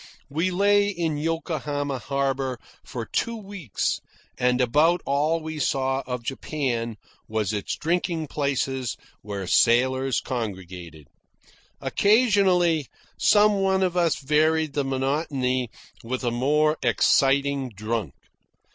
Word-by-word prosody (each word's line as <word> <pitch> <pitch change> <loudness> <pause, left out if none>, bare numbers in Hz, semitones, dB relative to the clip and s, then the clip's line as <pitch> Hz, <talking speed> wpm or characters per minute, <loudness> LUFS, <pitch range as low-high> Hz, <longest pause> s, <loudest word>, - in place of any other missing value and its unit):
We 165 +6 0
lay 200 +2 +3
in 170 -6 -1
Yokohama 150 -4 -2
harbour 135 -1 -1 0.3
for 120 -3 -6
two 230 - -1
weeks, 195 - -3 0.3
and 125 0 +1
about 150 +8 +3
all 150 +4 +1
we 160 0 -5
saw 135 -1 0
of 125 -2 -4
Japan 120 -4 -3 0.3
was 110 -2 -1
its 105 -2 -2
drinking 170 -1 -1
places 135 -4 -2 0.2
where 100 -2 -5
sailors 130 +5 +3
congregated. 90 - -6 0.7
Occasionally, 190 - +3 0.3
some 210 -1 +4
one 190 0 +2
of 180 -1 0
us 170 -3 +2
varied 155 +1 +1
the 145 - 0
monotony 135 -2 -1 0.3
with 130 +3 -4
a 120 - 0
more 150 +5 +2
exciting 140 -1 +2
drunk. 105 - -4
140 Hz, 110 wpm, -25 LUFS, 125-165 Hz, 0.7 s, some